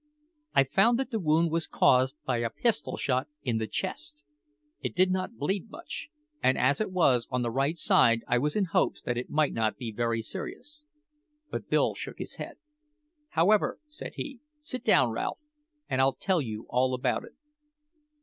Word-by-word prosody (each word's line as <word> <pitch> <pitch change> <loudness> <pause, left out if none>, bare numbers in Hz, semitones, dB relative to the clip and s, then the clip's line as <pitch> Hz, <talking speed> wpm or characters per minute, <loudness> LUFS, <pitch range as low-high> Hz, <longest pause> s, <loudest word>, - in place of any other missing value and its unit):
I 140 - +7
found 195 - +3
that 265 +1 -2
the 225 - 0
wound 165 -1 +2
was 165 0 0
caused 130 +2 +3
by 125 -2 +1
a 115 0 0
pistol 205 - 0
shot 130 +1 0 0.2
in 120 -4 0
the 110 - -2
chest. 150 +7 -4 0.6
It - - -4
did 185 +1 +4
not 185 +5 -2
bleed 195 +3 -2
much, 335 -1 -7 0.3
and 130 - +3
as 135 +9 +2
it 215 - -1
was 130 -10 +3
on 125 -1 0
the 120 - -1
right 140 +6 0
side, 115 -7 +4
I 120 - +3
was 150 +3 0
in 205 - +2
hopes - - +1
that 120 - -1
it 120 +1 -4
might 150 -1 +2
not 110 -1 0
be 120 -4 -5
very 115 0 -1
serious. 300 - -7 0.7
But - - -5
Bill - - +3
shook - - -7
his - - -6
head. - - -7 0.8
"However," 200 +6 +3
said 300 - -8
he, 275 -4 -6 0.2
"sit 265 -4 -5
down, - - +4
Ralph, - - -2 0.5
and 130 - +1
I'll 135 0 +4
tell 185 -4 +1
you 110 -4 -5
all 130 +1 +1
about 125 - 0
it. - - -14
145 Hz, 185 wpm, -28 LUFS, 125-190 Hz, 0.8 s, I